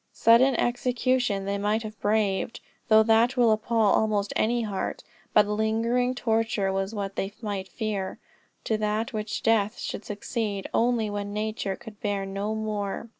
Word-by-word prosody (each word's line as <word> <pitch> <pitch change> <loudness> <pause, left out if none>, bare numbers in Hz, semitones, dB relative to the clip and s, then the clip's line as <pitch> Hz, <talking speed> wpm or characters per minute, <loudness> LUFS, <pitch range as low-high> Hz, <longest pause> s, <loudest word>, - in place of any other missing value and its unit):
Sudden 240 +3 +5
execution 245 -3 0
they 200 0 -1
might 210 +2 0
have 215 -2 -9
braved, 205 0 0 0.3
though 220 0 +6
that 230 +4 +3
will 235 -2 +5
appal 220 +2 -2 0.2
almost 210 -2 +1
any 235 +2 +1
heart; 205 -3 -3 0.3
but 210 - +5
lingering 225 +4 0
torture 225 -5 0
was 195 +3 -2
what 200 -1 -4
they 195 - -2
might 200 -4 -4
fear, 195 -1 -3 0.5
to 220 - 0 0.3
which 215 0 -4
death 215 -2 +2
should - - -5
succeed 210 -1 -3
only 235 -2 +2
when 205 0 -4
nature 210 -2 -2
could 210 -1 -12
bear 200 -2 -1
no 200 +2 -3
more. 215 0 -3
215 Hz, 150 wpm, -26 LUFS, 200-230 Hz, 0.5 s, though